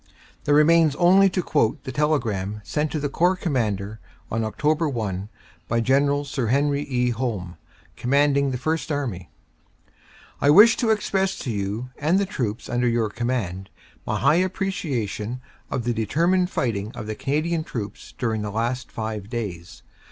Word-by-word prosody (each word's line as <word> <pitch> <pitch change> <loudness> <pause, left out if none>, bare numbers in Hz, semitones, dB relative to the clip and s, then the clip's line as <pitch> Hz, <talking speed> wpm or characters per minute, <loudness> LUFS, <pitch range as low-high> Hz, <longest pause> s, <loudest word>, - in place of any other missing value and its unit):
There 145 - +4
remains 155 0 +5
only 190 +4 +5
to 180 -1 -1
quote 145 -10 +1
the 130 - -5
telegram 115 -9 0
sent 150 +6 -1
to 155 - -1
the 145 - -1
Corps 175 +6 +2
Commander 110 - -2 0.3
on 110 - 0
Oct. 150 - 0
1 100 -3 -3 0.4
by 115 - +1
General 140 +4 +2
Sir 135 -4 -2
Henry 140 +3 +2
E. 125 -4 0
Home, 110 -8 -3 0.4
commanding 140 +2 +2
the 130 - -2
First 155 +5 -2
Army: 125 -11 -3 1.1
"I 140 - +4
wish 210 +9 +8
to 235 - +1
express 195 -3 +1
to 125 - -4
you 105 +4 -3
and 155 +6 +2
the 200 - +2
troops 120 - -3
under 120 0 0
your 115 -3 +1
com 120 +3 -3
mand 95 -6 -2 0.4
my - - 0
high 155 - +4
appreciation 135 - -2 0.3
of 125 - -2
the 120 +1 0
determined 170 - +1
fighting 110 - -2
of 105 - -7
the 110 - -3
Canadian 155 +7 -1
troops 110 -8 -7
during 110 -3 -1
the 105 - -3
last 120 +4 -2
five 110 -2 -5
days. 100 -8 -6
130 Hz, 160 wpm, -24 LUFS, 110-150 Hz, 1.1 s, wish